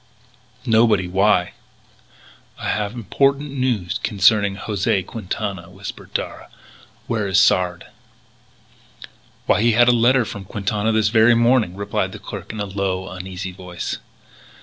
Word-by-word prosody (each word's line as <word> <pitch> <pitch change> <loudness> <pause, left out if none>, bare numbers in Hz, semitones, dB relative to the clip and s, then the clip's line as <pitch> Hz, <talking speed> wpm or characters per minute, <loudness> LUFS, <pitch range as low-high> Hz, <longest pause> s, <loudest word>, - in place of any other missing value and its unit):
"Nobody. 110 -5 +3
Why?" 95 0 +2 1.0
"I - - -4
have 105 +1 -2
important 140 +6 0
news 125 -10 -1
concerning 100 -1 +3
José 100 -3 -1
Quintana," 100 -4 -5
whispered 95 +2 -9
Darragh; - - -4 0.6
"Where 110 -3 -1
is 95 0 +3
Sard?" 90 -4 +2 1.6
"Why, - - +3
he 115 0 +3
had 120 +2 +5
a - - +7
letter 120 +1 +3
from 100 -2 -7
Quintana 105 +2 -1
this 110 -1 +2
very 110 +1 +5
morning," 115 -5 +3
replied 100 +1 -2
the - - -7
clerk - - -8
in 110 - -7
a 105 - -1
low, 95 -1 -3
uneasy 95 0 -6
voice. 90 -1 -6
105 Hz, 130 wpm, -21 LUFS, 95-115 Hz, 1.6 s, a